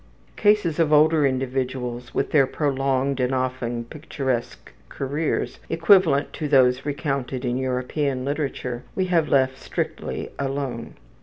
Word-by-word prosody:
Cases 205 -7 +2
of 160 -2 +3
older 155 -1 +5
individuals 130 -2 -3
with - - -1
their 140 -4 +4
prolonged 135 -2 0
and 130 +1 +1
often 125 -2 -2
picturesque 135 -3 -4 0.2
careers, 145 +4 -2
equivalent 165 -3 +4
to 155 - -3
those 130 -1 +3
recounted 135 -3 -2
in 120 0 0
European 130 +1 -1
literature, 135 -4 -3
we 190 - +1
have 170 -4 +1
left 130 -1 +2
strictly - - -4
alone. 135 -3 -3
135 Hz, 125 wpm, -23 LUFS, 130-150 Hz, 0.2 s, older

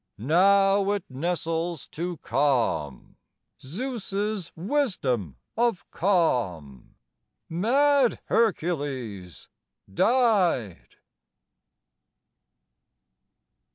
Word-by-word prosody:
Now 195 - +3
it 200 -3 -3
nestles 165 +2 -3
to 175 +1 -4
calm, 120 - -1 0.4
Zeus's 205 - -4
wisdom 160 - -1 0.2
of 235 -5 0
calm, 115 - -1 0.5
Mad 260 - +2
Hercules 140 - -2 0.5
died! 190 - +1
175 Hz, 50 wpm, -26 LUFS, 130-205 Hz, 0.5 s, Now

